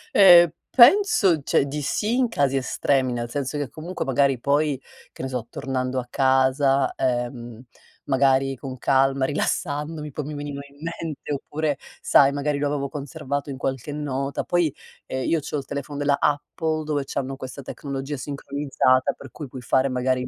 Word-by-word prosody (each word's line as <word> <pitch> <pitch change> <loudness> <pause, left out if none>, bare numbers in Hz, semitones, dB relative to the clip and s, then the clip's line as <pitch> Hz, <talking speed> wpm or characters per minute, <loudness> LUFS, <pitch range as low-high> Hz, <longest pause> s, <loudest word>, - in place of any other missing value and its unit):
Ehm, 175 -3 +9 0.2
penso, 235 - +6
cioè 140 - +2
di 145 +2 -4
sì 210 - 0
in 255 -1 +3
casi 140 -9 +1
estremi, 130 0 +1
nel 120 -1 -3
senso 140 +3 -3
che 145 -3 -3
comunque 170 +4 -5
magari 135 -1 +2
poi, 145 +1 +1 0.3
che - - -10
ne - - -1
so, 125 -3 -4
tornando 130 0 -2
a 125 - -6
casa, 135 +1 +2
ehm, 120 -2 -2 0.4
magari 135 0 +2
con 130 0 -7
calma, 135 +1 +2
rilassandomi, 150 +1 -2
poi 150 - -3
mi 150 - -6
venivano 145 -1 -5
in 140 - -21
mente, 160 -2 -5
oppure 145 +1 -2 0.2
sai, 140 -1 +5
magari 145 +1 -1
lo 145 +1 0
avevo 140 -1 -1
conservato 145 0 -5
in 135 - -5
qualche 135 +1 -3
nota. 140 -2 -3
Poi, 175 -5 +1 0.3
ehm, 130 0 -3
io 165 - +2
c'ho 150 - -4
il 140 - -5
telefono 140 0 -5
della 145 -1 +2
Apple 145 -1 +1 0.4
dove 150 -2 -1
c'hanno 135 0 -3
questa 135 +1 -8
tecnologia 140 +1 -5
sincronizzata, 140 -1 0
per 140 - -12
cui 145 +4 -8
puoi 130 0 -8
fare 130 +2 +2
magari 130 0 0
il 125 - -4
140 Hz, 170 wpm, -24 LUFS, 130-150 Hz, 0.4 s, Ehm